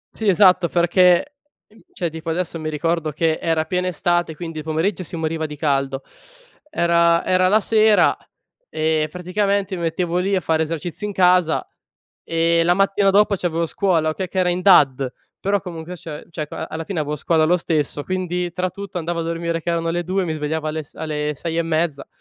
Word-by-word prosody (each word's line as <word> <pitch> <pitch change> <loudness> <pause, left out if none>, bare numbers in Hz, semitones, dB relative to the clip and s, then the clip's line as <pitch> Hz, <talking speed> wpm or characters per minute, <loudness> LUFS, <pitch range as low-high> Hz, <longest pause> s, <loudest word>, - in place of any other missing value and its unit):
Sì, 220 - -3
esatto 185 -2 +5
perché 180 - +3 0.3
ehm, 220 +1 -22
cioè 170 -3 -3
tipo 160 +1 -6
adesso 165 0 -2
mi 155 0 -3
ricordo 160 +1 -1
che 160 +1 0
era 160 -1 0
piena 180 +2 -1
estate, 175 -1 0
quindi 165 -1 -6
il - - -6
pomeriggio 160 +6 -1
si 175 - -7
moriva 160 -1 -2
di 150 - -8
caldo. 135 -2 -1 0.7
Era 170 - +2
era 185 0 +3
la 215 +3 +4
sera 215 0 +4 0.6
e 155 0 0
praticamente 195 +2 -1
mi 170 - -5
mettevo 170 +1 -1
lì 195 +2 +1
a 185 - +2
fare 160 -2 +1
esercizi 165 +4 -5
in 205 - -2
casa, 180 -3 +3 0.6
e 165 0 +1
la 175 - +4
mattina 195 0 +2
dopo 205 +1 +4
c'avevo 170 -2 -1
scuola, 165 -4 +1
okay, 185 +3 -4
che 190 - -4
era 180 -1 +3
in 180 +1 -2
DAD, 135 -9 +4 0.3
però 200 0 +1
comunque 175 -1 -7
cioè- 155 -3 -9
cioè 155 -2 -5
ca 160 - -6
alla 160 0 -5
fine 175 -2 -3
avevo 150 0 -2
scuola 160 +2 +2
lo 180 +3 +3
stesso, 150 -3 -1
quindi 180 0 -2
tra 180 +1 -2
tutto 200 -1 -9
andavo 170 +1 -3
a - - -2
dormire 165 0 -2
che - - -6
erano 165 0 -1
le 175 +1 -2
2:00 190 +2 0
e - - -1
mi 160 - -2
svegliavo 155 +1 -3
alle 155 0 -3
s - - -21
alle 150 -1 -3
6 165 +3 -4
e - - +2
mezza. 160 -3 -1
170 Hz, 205 wpm, -21 LUFS, 160-185 Hz, 0.7 s, esatto